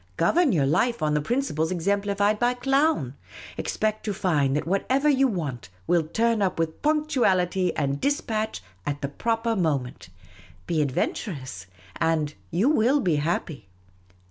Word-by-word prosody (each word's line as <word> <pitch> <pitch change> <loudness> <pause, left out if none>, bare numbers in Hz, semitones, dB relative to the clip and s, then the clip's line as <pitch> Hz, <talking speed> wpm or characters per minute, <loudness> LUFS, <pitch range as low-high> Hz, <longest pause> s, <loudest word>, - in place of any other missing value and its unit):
Govern 320 - +3
your 150 -8 +2
life 230 - +1
on 150 -1 +1
the 150 - +1
principles 160 - -1
exemplified 200 +3 0
by 245 +1 +2
Clown; 270 - +1 0.4
expect 215 0 -2
to 205 -2 -2
find 150 -9 +1
that 150 - -1
whatever 255 - +1
you 270 -2 +4
want 145 - -4 0.2
will 170 - +3
turn 225 +7 0
up 190 -2 0
with 165 -1 -2
punctuality 235 - +2
and 140 -2 -1
dis 285 +1 +1
patch 215 - -3 0.2
at 145 +5 -3
the 140 - -2
proper 230 +8 -1
moment. 140 - -2 0.6
Be 165 -3 0
adventurous 130 - -3 0.3
and 160 -2 0 0.2
you 185 +9 +1
will 280 -1 +3
be 175 - +1
happy. 145 - -2
185 Hz, 145 wpm, -25 LUFS, 150-235 Hz, 0.6 s, you